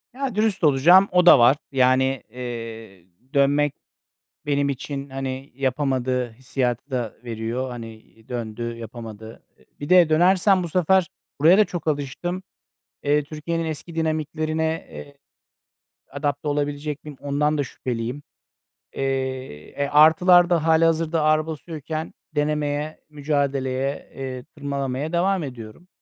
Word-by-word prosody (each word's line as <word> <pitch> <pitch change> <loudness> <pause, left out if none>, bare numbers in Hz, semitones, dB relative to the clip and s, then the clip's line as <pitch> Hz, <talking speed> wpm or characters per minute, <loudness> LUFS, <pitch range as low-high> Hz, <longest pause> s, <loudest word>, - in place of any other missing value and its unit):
Ya, 265 -5 -3
dürüst 215 -4 0
olacağım, 165 +7 +6
o 180 -1 +4
da 160 - +9
var. 125 +4 +6
Yani, 130 0 +2
eee, 115 -6 -8 0.3
dönmek 145 +1 +3 0.7
benim 140 -1 +1
için, 140 +1 -5
hani, 135 0 -5
yapamadığı 130 -2 -1
hissiyatı 130 +1 -3
da 120 -4 -2
veriyor. 120 +2 -3
Hani, 115 -2 -9 0.3
döndü, 120 -1 -4
yapamadı. 115 -1 -9 0.4
Bir 145 - -6
de 180 -3 +6
dönersem 185 +3 +4
bu 170 - -4
sefer 185 +1 +3 0.3
buraya 165 +7 +6
da 215 - +6
çok 175 -4 -6
alıştım. 155 +6 -2 0.6
Eee, 145 0 +2
Türkiye'nin 160 +3 -4
eski 160 +1 -6
dinamiklerine, 160 0 -1
eee, 140 0 -10 0.9
adapte 145 +1 -3
olabilecek 145 0 -2
miyim? 150 -3 -10
Ondan 150 +2 0
da 145 - +1
şüpheliyim. 125 +2 -5 0.7
Eee, 130 - -3
e, - - 0
artılar 175 +4 +6
da 170 -3 +2
hâlihazırda 165 0 +3
ağır 155 0 +3
basıyorken 155 0 -5 0.2
denemeye, 150 0 -1
mücadeleye, 140 -2 -2
eee, 130 -2 -5
tırmalamaya 140 +1 -3
devam 185 0 +1
ediyorum. 125 +5 -9
145 Hz, 120 wpm, -23 LUFS, 130-160 Hz, 0.9 s, da